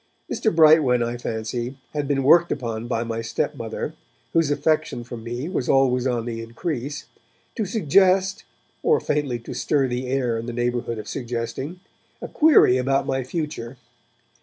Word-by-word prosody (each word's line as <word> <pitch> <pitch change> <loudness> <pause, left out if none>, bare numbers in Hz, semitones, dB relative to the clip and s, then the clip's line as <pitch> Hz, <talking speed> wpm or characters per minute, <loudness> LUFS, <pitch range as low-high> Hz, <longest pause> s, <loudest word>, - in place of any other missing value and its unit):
Mr. 220 - +1
Brightwen, 155 -6 +5
I 120 +1 -2
fancy, 120 +2 -4 0.2
had 145 -2 -2
been 135 -1 +1
worked 170 +5 +5
upon 115 -3 -3
by 115 -1 -1
my 115 -1 -3
stepmother, 115 0 -3 0.4
whose 165 -3 +3
affection 145 -4 0
for 120 +1 -8
me 120 +5 -5
was 170 -9 -2
always 130 -1 +3
on 120 -3 -1
the 115 -1 -4
increase, 140 +4 -4 0.5
to 220 - -2
suggest, 190 +1 +2 0.4
or 455 0 +3
faintly 145 -5 -1
to 115 - -8
stir 140 -3 +1
the 125 +1 -3
air 125 -3 0
in 115 - -6
the 120 - -4
neighbourhood 120 -1 -1
of 105 -1 -7
suggesting, 125 +7 -4 0.4
a - - -6
query 300 - +5
about 135 +2 +1
my 130 0 -1
future. 135 -4 -5
130 Hz, 160 wpm, -23 LUFS, 120-150 Hz, 0.5 s, Brightwen